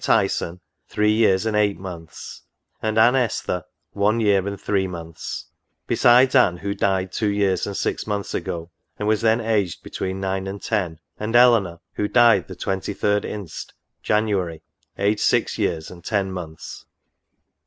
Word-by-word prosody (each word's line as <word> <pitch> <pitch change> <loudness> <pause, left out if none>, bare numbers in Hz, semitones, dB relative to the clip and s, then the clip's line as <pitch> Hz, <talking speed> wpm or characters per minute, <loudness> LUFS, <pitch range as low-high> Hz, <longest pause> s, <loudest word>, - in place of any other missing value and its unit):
Tyson, 95 -4 +1 0.3
three 105 0 +2
years 105 -2 +3
and 110 -1 0
eight 105 -1 +2
months; 85 -4 -9 0.4
and 110 0 -1
Anne 120 +3 +6
Esther, 115 -8 -1 0.3
one 105 +3 +1
year 100 -3 +2
and 100 -1 -4
three 95 -2 0
months: 85 -2 -7 0.4
besides 125 +2 +5
Anne 110 -10 +4
who 100 +2 -3
died 95 -2 0
two 110 - -1
years 100 -3 +1
and 100 - -4
six - - -2
months 100 -2 -3
ago, 85 0 -4 0.3
and 105 - -3
was 110 -1 +2
then 115 0 +3
aged 105 -6 -1
between 95 0 -4
nine 95 0 -2
and 100 +1 -5
ten; 95 -7 -1 0.2
and 110 +2 -2
Eleanor, 115 -9 +5
who 105 - -1
died 115 -6 +4
the 95 - -8
23d 100 +2 -1
inst., 100 -6 -7 0.3
January, 100 -6 0 0.3
aged 105 +2 +1
six - - +1
years 80 -1 -1
and 85 -2 -12
ten 100 -3 -1
months. 85 -4 -8
100 Hz, 155 wpm, -22 LUFS, 95-110 Hz, 0.4 s, Anne